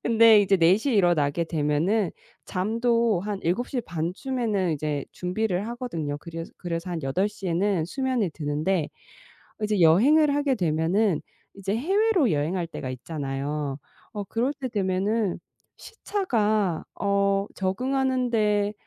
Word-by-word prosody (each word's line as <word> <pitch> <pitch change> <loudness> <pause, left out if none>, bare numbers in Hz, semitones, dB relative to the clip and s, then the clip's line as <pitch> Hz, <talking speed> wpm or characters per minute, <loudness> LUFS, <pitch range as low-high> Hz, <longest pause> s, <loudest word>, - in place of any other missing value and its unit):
근데 225 -2 +6
이제 195 -1 +3
4:00 185 +10 +3
에 - - +1
일어나게 170 -5 +2
되면 165 +6 +1 0.3
잠도 230 +1 +1
한 205 0 -3
7:30 180 - -2
쯤에는 220 - -1
이제 150 -1 -2
준비를 185 +2 -2
하거든요. 170 - -4
그래스 165 +1 -8
그래서 170 0 -4
한 170 -2 -3
8:00 195 +8 -1
에는 180 0 +1
수면에 255 -2 -1
드는데 155 +3 -1 0.7
어 - - -1
이제 210 -2 0
여행을 280 - +5
하게 285 -2 +1
되면은 170 +2 +1 0.3
이제 195 +1 -2
해외로 375 - +2
여행할 165 +4 -1
때가 135 -5 -6
있잖아요. 140 +1 -4 0.3
어 205 -3 -4
그럴 240 +8 -1
때 270 -3 -5
되면은 200 -1 0 0.4
시차가 215 - -1 0.2
어 200 0 +1
적응하는데 235 -1 0
195 Hz, 260 characters per minute, -25 LUFS, 165-230 Hz, 0.7 s, 근데